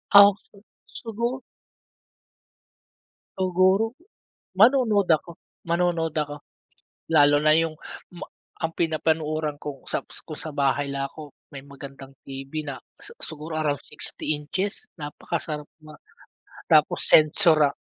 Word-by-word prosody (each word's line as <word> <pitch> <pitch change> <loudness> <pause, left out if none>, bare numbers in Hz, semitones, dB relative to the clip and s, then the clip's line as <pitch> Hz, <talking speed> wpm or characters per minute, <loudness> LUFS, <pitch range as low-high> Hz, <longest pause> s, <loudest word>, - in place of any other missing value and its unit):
Okey, 200 0 +6 0.2
sugo 235 +3 -4 1.9
Siguro, 190 +4 +2 0.7
manonood 220 -4 +5
ako, 170 - -13 0.4
manonood 170 -2 +1
ako 145 -1 -2 0.7
lalo 145 -2 +5
na 155 0 +5
yung 165 -1 +1 0.4
ma 175 - -7 0.3
ang 165 -1 -3
pinapanooran 155 -2 0
kong 145 -2 -9
saps - - -4
ko 155 - -8
sa 155 - -7
bahay 140 0 0
lang 140 0 -2
ako, 150 0 -11 0.2
may 135 - -7
magandang 140 -1 -11 0.2
TV 135 0 -8 0.2
na 140 - -4 0.2
si - - -11
siguro 155 +1 -6
around 150 -3 0
60 150 0 -4
inches, 185 +7 -3 0.2
napakasarap 150 0 -4 0.2
ma 155 -1 -13 0.7
tapos - - +4
sensora 155 -2 +5
155 Hz, 110 wpm, -25 LUFS, 145-180 Hz, 1.9 s, Okey